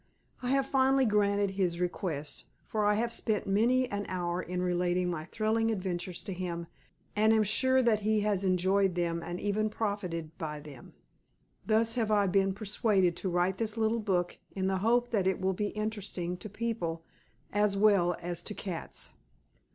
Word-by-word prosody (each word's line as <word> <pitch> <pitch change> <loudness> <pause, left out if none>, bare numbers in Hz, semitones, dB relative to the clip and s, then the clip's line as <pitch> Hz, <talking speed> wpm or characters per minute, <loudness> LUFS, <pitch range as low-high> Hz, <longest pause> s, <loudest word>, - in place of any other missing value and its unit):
I 250 - -2
have 270 0 +2
finally 270 0 +3
granted 205 -2 +2
his 180 -3 -1
request, 165 -4 -3 0.2
for 215 -1 -1
I 210 - +4
have 230 +2 -1
spent 215 -3 -1
many 240 +6 +3
an 205 0 -3
hour 175 -1 -2
in 180 0 -4
relating 180 0 +1
my 155 -2 -4
thrilling 220 +4 0
adventures 185 -4 -3
to 195 - -4
him 175 -2 -4 0.5
and 215 +1 +4
am 220 -1 +4
sure 260 +5 +3
that 225 -3 +3
he 215 0 +1
has 205 -2 0
enjoyed 190 0 +2
them 170 -1 -1
and 175 +1 -5
even 210 +1 0
profited 180 -7 -3
by 150 -3 -4
them. 145 -4 -12 0.7
Thus 225 +1 +3
have 220 - 0
I 205 -1 +4
been 195 0 +2
persuaded 200 -3 +1
to 190 - -2
write 180 +2 +1
this 225 -1 -1
little 225 +1 +1
book 180 -5 -1 0.2
in 190 -1 -1
the 190 0 +1
hope 240 +4 +2
that 200 -5 +1
it 190 0 +1
will 190 0 +1
be 205 +3 -1
interesting 205 -5 -3
to 195 +4 -8
people 195 -7 -3 0.5
as 205 -1 +2
well 195 -4 +4
as 175 0 -3
to 210 - -5
cats. 180 -4 -5
200 Hz, 175 wpm, -30 LUFS, 180-215 Hz, 0.7 s, I